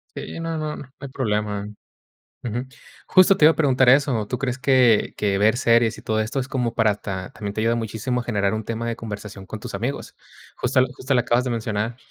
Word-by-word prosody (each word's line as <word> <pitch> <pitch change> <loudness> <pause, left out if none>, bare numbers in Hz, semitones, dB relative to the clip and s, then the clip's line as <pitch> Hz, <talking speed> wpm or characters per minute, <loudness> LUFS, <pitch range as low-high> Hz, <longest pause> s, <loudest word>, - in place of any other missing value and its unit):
Sí, - - -6
no 165 -1 -3
no 155 -1 -3
no 130 - -11
hay 140 - -7
problema 105 -6 -2 0.8
ujú. 120 +2 -3 0.4
Justo 185 +1 +6
te 175 - 0
iba 155 - +9
a - - -6
preguntar 130 -4 +4
eso, 130 -5 +3
¿tú 125 +5 -3
crees 125 0 -2
que 130 -5 +3
que 100 -2 +1
ver 110 +4 +3
series, 115 -2 +3
y - - -11
todo 110 0 0
esto 110 +5 -2
es 130 - -3
como 125 -3 -1
para 110 -3 +2
ta 95 -3 -6
también 100 -1 -5
te 110 - -4
ayuda 115 +1 +2
muchísimo 115 +2 -2
a - - -9
generar 100 -4 0
un 110 0 -3
tema 115 +1 -4
de 115 - -2
conversación 105 -3 -8
con - - -7
tus - - -8
amigos? - - -4 0.4
Justo 125 +1 +1
lo 130 - +4
justo 130 +2 -2
lo 125 - +4
acabas 120 0 +2
de 130 - -3
mencionar. 110 0 -2
115 Hz, 230 wpm, -23 LUFS, 105-130 Hz, 0.8 s, iba